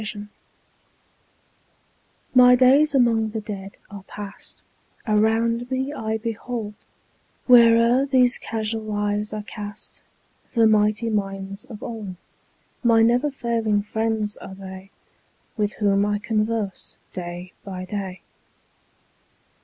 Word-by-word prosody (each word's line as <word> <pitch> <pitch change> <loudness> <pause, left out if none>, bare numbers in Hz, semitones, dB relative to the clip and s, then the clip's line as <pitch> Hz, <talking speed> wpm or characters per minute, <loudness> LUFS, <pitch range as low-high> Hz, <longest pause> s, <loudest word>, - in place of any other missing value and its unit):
His 215 - -2
Books 205 0 -8 2.0
MY 250 -1 +8
days 275 +4 +5
among 230 -4 +3
the 220 +1 -4
Dead 200 -2 -8
are 200 -1 -8
past; 205 -1 -9 0.4
Around 225 +2 +1
me 265 +2 -2
I 220 -4 -2
behold, 225 -1 -4 0.7
Where'er 235 +2 +6
these 255 -2 +3
casual 220 -1 -3
eyes 205 0 -1
are 210 -1 -4
cast, 205 -1 -9 0.5
The 230 -1 +5
mighty 215 +1 +3
minds 195 -1 -3
of 215 -3 -10
old: 215 -5 -6 0.7
My 230 -2 +5
never 245 +6 +3
failing 230 -6 0
friends 220 -1 -2
are 190 - -10
they, 190 0 -10 0.6
5 - - -39
With 210 -1 0
whom 200 -1 +2
I 205 0 0
converse 215 -1 -2 0.2
day 175 0 -7
by 185 -2 -6
day. 190 -1 -5
215 Hz, 115 wpm, -23 LUFS, 205-235 Hz, 2.0 s, MY